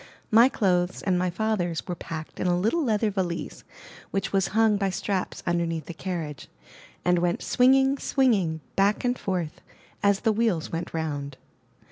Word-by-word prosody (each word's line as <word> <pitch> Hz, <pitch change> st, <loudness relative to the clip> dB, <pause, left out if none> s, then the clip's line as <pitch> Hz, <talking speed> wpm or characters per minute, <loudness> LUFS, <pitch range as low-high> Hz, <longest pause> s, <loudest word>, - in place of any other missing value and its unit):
My 230 Hz, +4 st, +7 dB
clothes 180 Hz, -6 st, 0 dB
and 185 Hz, -3 st, +1 dB
my 180 Hz, 0 st, +1 dB
father's 180 Hz, -3 st, -1 dB
were 180 Hz, -, -2 dB
packed 160 Hz, -2 st, -7 dB
in -, -, 0 dB
a 175 Hz, 0 st, +2 dB
little 225 Hz, -, +1 dB
leather 220 Hz, -3 st, +1 dB
valise 180 Hz, -4 st, -3 dB, 0.5 s
which 195 Hz, -, -2 dB
was 195 Hz, -1 st, +2 dB
hung 220 Hz, -2 st, +5 dB
by 195 Hz, -1 st, 0 dB
straps 190 Hz, 0 st, -3 dB
underneath 170 Hz, -3 st, -1 dB
the 170 Hz, -, -7 dB
carriage, 165 Hz, -4 st, -5 dB, 0.6 s
and 180 Hz, 0 st, +3 dB
went 175 Hz, 0 st, 0 dB
swing 255 Hz, +1 st, +4 dB
ing, 270 Hz, +1 st, +2 dB
swinging, 195 Hz, -, +1 dB
back 200 Hz, +4 st, +2 dB
and 245 Hz, 0 st, +2 dB
forth, 175 Hz, -5 st, -3 dB, 0.4 s
as 200 Hz, -1 st, +3 dB
the 220 Hz, -2 st, +2 dB
wheels 210 Hz, -7 st, 0 dB
went 170 Hz, +1 st, -4 dB
round. 145 Hz, -4 st, -4 dB
185 Hz, 165 wpm, -26 LUFS, 170-215 Hz, 0.6 s, My